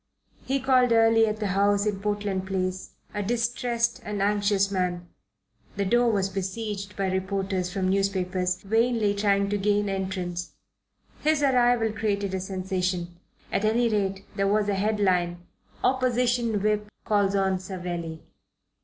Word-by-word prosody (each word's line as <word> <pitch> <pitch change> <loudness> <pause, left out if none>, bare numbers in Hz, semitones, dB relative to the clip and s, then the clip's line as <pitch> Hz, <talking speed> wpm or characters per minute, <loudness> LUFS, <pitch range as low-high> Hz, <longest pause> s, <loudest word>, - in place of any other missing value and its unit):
He 275 +1 0
called 255 -2 +3
early 225 0 +5
at 215 0 -1
the 210 - -2
house 200 +1 +2
in 205 -2 -1
Portland 205 -2 -2
Place, 185 -1 -3 0.2
a 205 - -2
distressed 235 +2 -1
and 210 -1 -4
anxious 200 0 +2
man. 180 -2 -1 0.7
The 200 - -1
door 240 +4 +3
was 195 -3 +1
besieged 200 +1 -4
by 195 -1 -1
reporters 190 -1 -1
from 185 0 -1
newspapers, 185 -2 0
vainly 225 0 +2
trying 200 -1 +2
to 205 - 0
gain, 205 +1 +1
entrance. 185 -2 -3 0.7
His 305 -1 +2
arrival 245 -4 +3
created 205 -3 -1
a 190 - -1
sensation. 185 -2 -2 0.4
At - - 0
any 230 +2 +2
rate 195 -2 -1
there 195 -1 +1
was 205 +1 +2
a - - +2
headline 185 -4 0 0.4
"Opposition 245 -4 +1
Whip 210 0 +1 0.2
calls 200 -2 +2
on 190 -1 +1
Savelli." 175 -4 -5
200 Hz, 140 wpm, -26 LUFS, 190-220 Hz, 0.7 s, early